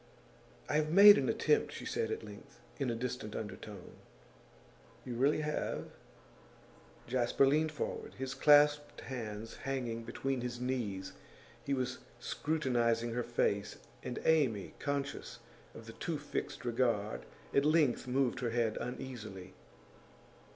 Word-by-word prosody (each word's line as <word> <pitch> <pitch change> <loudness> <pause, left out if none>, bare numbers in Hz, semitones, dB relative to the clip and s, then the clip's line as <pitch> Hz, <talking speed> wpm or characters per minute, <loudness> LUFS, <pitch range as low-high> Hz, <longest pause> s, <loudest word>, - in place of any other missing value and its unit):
'I - - -1
have 155 0 +1
made 205 +3 +10
an - - 0
attempt,' 445 - +2
she - - -7
said 460 -1 -1
at 440 0 -3
length, - - -12 0.2
in 135 -3 0
a 115 - -1
distant 125 -2 -4
undertone. 105 -3 -7 1.1
'You 125 - -4
really 140 +6 +2
have?' 150 0 -3 1.1
Jasper 125 +2 +2
leaned 155 +3 +3
forward, 150 - -4
his 130 0 -4
clasped 145 +1 +5
hands 115 -4 -6
hanging 120 -4 -3
between 130 +3 -2
his 120 0 -4
knees. 115 -7 -2 0.5
He 140 - 0
was 130 -1 -2 0.2
scrutinising 120 -6 0
her 120 - 0
face, 105 -4 0 0.2
and 125 - -5
Amy, 135 -11 +2
conscious 140 -1 -3 0.4
of - - -10
the - - -9
too - - -3
fixed - - -5
regard, 115 - 0 0.3
at 140 - +4
length 150 -5 +3
moved 130 0 +1
her 120 - -1
head 115 -2 0
uneasily. 110 -7 -6
125 Hz, 130 wpm, -33 LUFS, 115-145 Hz, 1.1 s, made